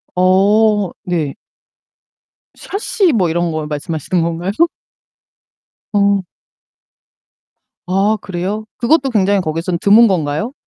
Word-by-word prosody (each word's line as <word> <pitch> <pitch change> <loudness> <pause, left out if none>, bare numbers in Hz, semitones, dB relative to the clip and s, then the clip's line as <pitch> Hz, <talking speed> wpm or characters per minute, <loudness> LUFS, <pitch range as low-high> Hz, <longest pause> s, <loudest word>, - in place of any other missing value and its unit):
어. 200 +2 +3
네. 160 -6 -2 1.2
샤시 400 -2 -1
뭐 185 -6 +1
이런 170 +1 -1
거 155 -1 -3
말씀하시는 160 +3 -2
건가요? 170 +3 -2 1.4
어. 200 -1 +2 1.6
아 195 +4 +1
그래요? 190 +4 -4
그것도 270 +3 +2
굉장히 200 -3 +2
거기선 165 +2 -2
드문 215 +5 +6
건가요? 170 - -1
190 Hz, 195 characters per minute, -16 LUFS, 170-210 Hz, 1.6 s, 드문